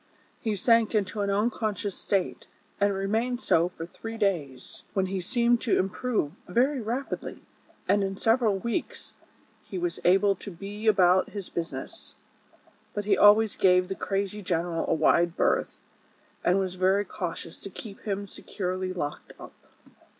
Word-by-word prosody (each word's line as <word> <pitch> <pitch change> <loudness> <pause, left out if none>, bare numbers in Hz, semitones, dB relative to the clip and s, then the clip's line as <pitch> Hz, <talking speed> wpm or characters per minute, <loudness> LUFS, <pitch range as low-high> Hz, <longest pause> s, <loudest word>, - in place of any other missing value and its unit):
He 220 -2 -1
sank 230 +2 +3
into 205 0 0
an 200 - 0
unconsious 210 -1 -1
state, 195 -3 -1 0.3
and 200 0 +3
remained 220 +6 -1
so 170 -7 +2
for 165 -2 -7
three 225 +6 -8
days, 155 - -2
when 190 -1 +2
he 190 0 -3
seemed 235 +5 +2
to 230 - +2
improve 195 - -1
very 260 +3 +2
rapidly, 240 +5 -4 0.4
and 205 - +3
in 195 0 -3
several 225 -3 +2
weeks 235 +4 -4 0.5
he 190 - -7
was 175 -1 -2
able 195 +3 +4
to - - -8
be 200 +4 -7
about 185 -3 +4
his 200 -3 -6
business; 170 -1 -6 0.8
but 205 -1 -2
he 205 -1 +4
always 210 +1 +6
gave 180 -1 +4
the - - -1
crazy 200 +1 -2
gen 175 -3 0
eral 165 -2 -2
a - - +2
wide 170 +2 +3
berth, - - +1 0.7
and 180 - +3
was 190 -2 -1
very 190 +2 +2
cautious 175 -4 -5
to - - -7
keep 200 +1 -9
him 200 -1 -3
securely 185 -1 -4
locked 145 -5 -5
up. - - -10
195 Hz, 155 wpm, -27 LUFS, 180-215 Hz, 0.8 s, always